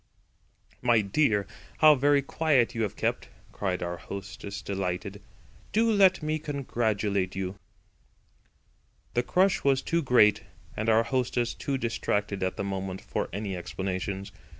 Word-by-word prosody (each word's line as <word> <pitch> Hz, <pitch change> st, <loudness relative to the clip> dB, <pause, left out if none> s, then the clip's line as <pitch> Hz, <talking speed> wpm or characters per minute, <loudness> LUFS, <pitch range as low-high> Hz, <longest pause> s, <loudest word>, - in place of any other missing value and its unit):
"My 120 Hz, -3 st, +4 dB
dear! 105 Hz, -1 st, +2 dB, 0.3 s
how 155 Hz, -1 st, +8 dB
very 140 Hz, 0 st, +3 dB
quiet 135 Hz, -5 st, +2 dB
you 115 Hz, -, -2 dB
have 105 Hz, -3 st, -1 dB
kept!" -, -, -2 dB, 0.2 s
cried 95 Hz, -3 st, -2 dB
our 85 Hz, 0 st, -3 dB
hostess 100 Hz, +1 st, -7 dB
delighted. 95 Hz, +1 st, -3 dB, 0.5 s
"Do 225 Hz, +2 st, +3 dB
let 190 Hz, -5 st, +4 dB
me 155 Hz, +1 st, -1 dB
congratulate 110 Hz, -, -1 dB
you." 95 Hz, -1 st, -3 dB, 1.6 s
The 120 Hz, -, +2 dB
crush 185 Hz, +9 st, +2 dB
was 135 Hz, -1 st, +2 dB
too 170 Hz, 0 st, +1 dB
great 125 Hz, -7 st, +4 dB, 0.3 s
and 110 Hz, +1 st, -1 dB
our 110 Hz, +1 st, +5 dB
hostess 125 Hz, -1 st, 0 dB
too 140 Hz, -1 st, -2 dB
distracted 105 Hz, -4 st, -1 dB
at 95 Hz, 0 st, -1 dB
the -, -, -2 dB
moment 95 Hz, -1 st, -4 dB
for -, -, -3 dB
any 100 Hz, 0 st, -3 dB
explanations. 95 Hz, +2 st, -4 dB
110 Hz, 135 wpm, -28 LUFS, 95-140 Hz, 1.6 s, how